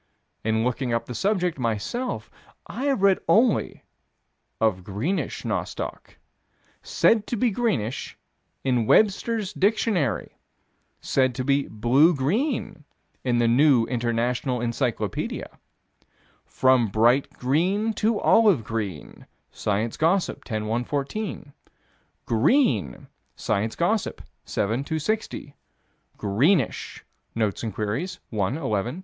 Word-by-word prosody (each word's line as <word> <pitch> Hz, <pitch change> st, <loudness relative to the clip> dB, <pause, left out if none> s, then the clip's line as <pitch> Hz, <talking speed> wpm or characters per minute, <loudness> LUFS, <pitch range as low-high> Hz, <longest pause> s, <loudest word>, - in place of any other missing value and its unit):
In 110 Hz, 0 st, +1 dB
looking 125 Hz, +1 st, -1 dB
up 115 Hz, 0 st, -2 dB
the 125 Hz, -, -7 dB
subject, 180 Hz, -, 0 dB
myself, 120 Hz, -, -3 dB, 0.3 s
I 265 Hz, -, -5 dB
have 270 Hz, -8 st, +1 dB
read 195 Hz, -1 st, +5 dB
only 220 Hz, +6 st, +2 dB, 0.8 s
of 105 Hz, -5 st, +1 dB
greenish 105 Hz, -, -3 dB
nostoc. -, -, -4 dB, 0.6 s
Said 220 Hz, -2 st, +2 dB
to 240 Hz, -, -2 dB
be 240 Hz, +2 st, +2 dB
greenish, 190 Hz, -, -2 dB, 0.5 s
in 125 Hz, -4 st, +1 dB
Webster's 215 Hz, 0 st, +2 dB
Dictionary 195 Hz, -, 0 dB, 0.6 s
said 130 Hz, -2 st, +1 dB
to 130 Hz, -, -2 dB
be 140 Hz, +1 st, +1 dB
"blue 130 Hz, +10 st, +3 dB
green" 190 Hz, -, -1 dB, 0.4 s
in 125 Hz, -2 st, +1 dB
the 120 Hz, -1 st, +3 dB
New 125 Hz, 0 st, +4 dB
International 120 Hz, +1 st, -1 dB
Encyclopedia 115 Hz, -3 st, -3 dB, 0.9 s
"from 130 Hz, -3 st, +3 dB
bright 120 Hz, +7 st, +2 dB
green 185 Hz, -, 0 dB
to 215 Hz, +1 st, +1 dB
olive 205 Hz, -, +4 dB
green" 105 Hz, -8 st, -5 dB, 0.2 s
(Science 105 Hz, +3 st, -2 dB
Gossip, 170 Hz, +4 st, +1 dB
10 110 Hz, -3 st, -3 dB
114); 140 Hz, -, -3 dB, 0.7 s
"green" 115 Hz, -, +2 dB, 0.3 s
(Science 110 Hz, +2 st, -1 dB
Gossip, 200 Hz, +5 st, -1 dB, 0.2 s
7 115 Hz, +6 st, -1 dB
260); 160 Hz, -1 st, -3 dB, 0.6 s
"greenish" 130 Hz, -, 0 dB, 0.3 s
(Notes 110 Hz, -4 st, -1 dB
and 115 Hz, -, -3 dB
Queries, 115 Hz, -, -3 dB
1 110 Hz, +4 st, -1 dB
11 -, -, -6 dB
219). 110 Hz, -, -1 dB
130 Hz, 105 wpm, -25 LUFS, -, 0.9 s, read